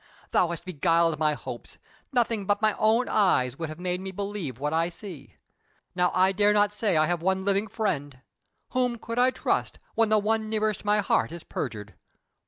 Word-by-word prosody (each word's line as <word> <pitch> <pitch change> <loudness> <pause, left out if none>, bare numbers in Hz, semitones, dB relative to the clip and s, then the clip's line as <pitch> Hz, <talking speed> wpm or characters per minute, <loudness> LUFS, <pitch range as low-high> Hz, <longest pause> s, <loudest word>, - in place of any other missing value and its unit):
Thou 180 - +3
hast 170 +1 -6
beguiled 165 -2 +1
my 155 -1 +2
hopes! - - -8 0.3
Nothing 230 -6 0
but 205 0 +2
my 215 -1 +3
own 225 +3 +3
eyes 135 - +2
would 165 -2 -3
have 155 +2 -8
made 180 0 -2
me 190 - -5
believe 195 - -4
what 150 +3 -2
I 165 +1 +1
see. 165 - -10 0.6
Now 180 0 +2
I 185 +1 +4
dare 205 +1 +3
not 205 0 +3
say 210 -5 +1
I 155 - +4
have 175 0 -1
one 190 +1 0
living 200 +2 +1
friend, 160 - -2 0.5
whom 250 -2 0
could 230 +1 -4
I 250 +1 +5
trust, - - -1 0.2
when 225 -1 +2
the 215 - +4
one 215 +1 0
nearest 215 -1 -1
my 210 0 +3
heart 190 - +1
is 170 -1 -8
perjured? 105 -5 -5
190 Hz, 190 wpm, -27 LUFS, 165-215 Hz, 0.6 s, I